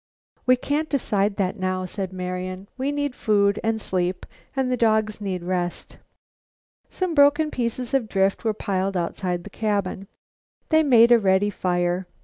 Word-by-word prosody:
"We 255 - +6
can't 295 +5 -2
decide 205 -7 0
that 195 +1 -1
now," 185 0 -1
said 190 +1 -5
Marian. 185 +1 -5
"We 265 +2 -1
need 285 -2 -2
food 205 -3 +2
and 225 0 0
sleep 185 -2 -2 0.3
and 265 -2 0
the - - +2
dogs 220 -2 +1
need 185 -3 -3
rest." 175 -1 -3 0.9
Some 370 -2 -2
broken 290 +1 +4
pieces 240 0 -3
of 250 -5 +1
drift 195 +2 +1
were 220 -2 0
piled 195 -2 -1
outside 175 0 -2
the - - -10
cabin. 200 -3 -2 0.6
These 315 -1 +4
made 235 -3 +6
a 240 - +7
ready 195 0 +2
fire. 175 -1 -1
205 Hz, 155 wpm, -24 LUFS, 185-245 Hz, 0.9 s, a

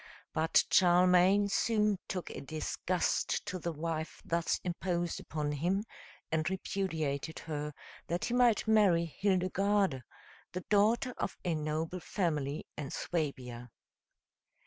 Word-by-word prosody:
But 160 +1 +3
Charlemagne 180 +2 +5
soon 210 -1 +2
took 180 -2 -4
a - - -6
disgust 160 +4 -1
to 185 - -4
the 170 0 -2
wife 160 0 -4
thus 170 0 0
imposed 175 -1 -2
upon 150 -2 -3
him, 175 +8 0 0.5
and 160 +2 +1
repudiated 160 -6 -2
her, 150 -2 -4 0.4
that 175 +1 -1
he 240 - -2
might 245 -3 +4
marry 200 -6 +4
Hildegarde, 190 -2 +1 0.5
the 180 - -3
daughter 220 +6 +2
of - - -2
a 175 - +1
noble 155 +3 -2
family 155 -6 -2
in 145 -3 -5
Suabia. 125 -9 -3
175 Hz, 120 wpm, -32 LUFS, 155-195 Hz, 0.5 s, Charlemagne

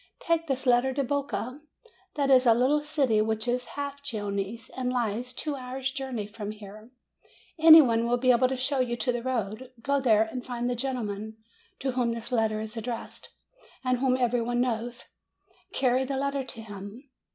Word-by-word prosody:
Take 330 0 0
this 270 -1 -1
letter 250 +1 +3
to 280 - +1
Boca. 280 0 -3 0.5
That 280 -2 +1
is 255 -1 +6
a 230 - +7
little 265 +5 +3
city 280 -8 +1
which 220 +1 -1
is 245 +1 0
half 280 0 -4
Genoese, 210 -3 -4
and 255 -1 -2
lies 240 0 -1
two 290 +3 -3
hours' 260 0 -4
journey 265 -6 -4
from 210 0 -7
here. 215 +1 -10 0.7
Any 320 0 +10
one 230 -2 +1
will 245 +1 +2
be 255 +1 +4
able 250 +1 +4
to 260 0 -3
show 265 +2 0
you 245 -2 0
the 240 0 -1
road. 245 0 -3
Go 280 0 +2
there 220 -5 +4
and 245 +3 -6
find 245 -1 -3
the 245 - 0
gentleman 220 -4 -3 0.4
to 265 - 0
whom 245 -2 0
this 230 +2 -7
letter 220 -3 +1
is 220 +1 -6
addressed, 230 +1 -6 0.5
and 255 -1 +1
whom 255 -1 +2
every 245 -1 +1
one 240 +1 -1
knows. 240 0 -2 0.7
Carry 255 0 +2
the 270 +1 -3
letter 280 0 -1
to 230 -3 -8
him. 205 +5 -9
245 Hz, 185 wpm, -27 LUFS, 225-265 Hz, 0.7 s, Any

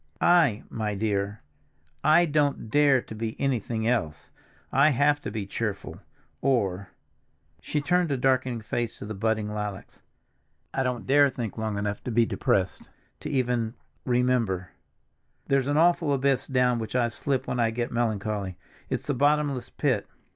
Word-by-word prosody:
"I, 170 -12 +4
my 105 -2 -3
dear! 100 -1 -2 0.6
I 160 +3 +5
don't 145 -7 0
dare 140 -3 +4
to - - -9
be 110 +1 -5
anything 115 -4 -1
else. 80 -12 -1 0.4
I 140 +3 +5
have 145 +1 +2
to - - -4
be 105 -3 -4
cheerful, 100 0 -4 0.4
or—" 100 -8 0 0.7
She 150 - -2
turned 175 +1 +1
a 135 - +1
darkening 130 -2 +1
face 115 +2 -3
to - - -8
the 110 - -5
budding 105 0 -1
lilacs. 105 -2 -6 0.7
"I 135 - 0
don't 125 -2 -2
dare 145 +2 +5
to - - +2
think 120 -5 -5
long 110 -2 -3
enough 100 0 -3
to 125 - -2
be 115 +1 +4
depressed, 95 -4 -1 0.3
to 150 - -6
even—remember. 120 - -1 0.7
There's 135 -1 +1
an 145 +1 +1
awful 170 -2 +3
abyss 135 -1 +1
down 125 -2 +2
which 110 +2 -5
I 120 -2 +3
slip 130 +3 -2
when 125 - -2
I 115 -1 +3
get 120 +1 -3
melancholy; 105 -5 -2 0.3
it's - - -2
the 145 - 0
bottomless 145 -1 +1
pit. 125 -9 0
120 Hz, 155 wpm, -26 LUFS, 110-140 Hz, 0.7 s, I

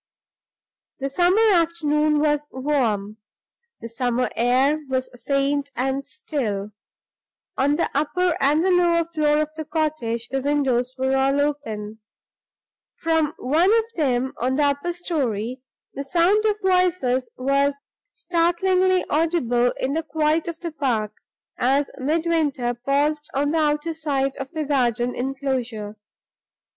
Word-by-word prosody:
The 275 0 -2
summer 360 +9 +3
afternoon 305 -3 +2
was 295 -1 +1
warm; 235 -7 -1 0.6
the - - -6
summer 245 +1 -1
air 260 +6 +2
was 260 -1 -2 0.2
faint 280 0 +1
and 265 +3 -1
still. 225 -9 -4 0.8
On 285 +2 +2
the 335 - +1
upper 345 +4 +1
and 300 +5 +3
the 380 - +3
lower 345 -2 +3
floor 305 -3 +1
of 305 0 -8
the 315 0 -5
cottage 300 -7 -2
the 270 0 -1
windows 260 -3 0
were 265 +1 +1
all 270 +1 +2
open. 220 -8 -3 1.0
From 320 -2 0
one 315 +8 +2
of 455 0 +3
them, 260 -4 0
on 255 +2 0
the 295 - +2
upper 285 +4 0
story, 255 - -2 0.3
the 275 - -4
sound 355 +8 +2
of 425 -1 +1
voices 360 -9 +2
was 275 +2 +1 0.3
startlingly 365 +2 +1
audible 290 -7 +1
in 265 +2 -1
the 325 - 0
quiet 310 +1 0
of 335 -1 -5
the 340 -1 -4
park 235 -9 -1 0.5
as 270 +3 +2
Midwinter 300 -4 0
paused 285 +5 -1
on 290 +1 +1
the 325 - +1
outer 300 +2 0
side 275 -4 -1
of 270 -1 -5
the 315 -2 -3
garden 245 -4 0
inclosure. 250 -5 -3
285 Hz, 130 wpm, -23 LUFS, 255-320 Hz, 1.0 s, summer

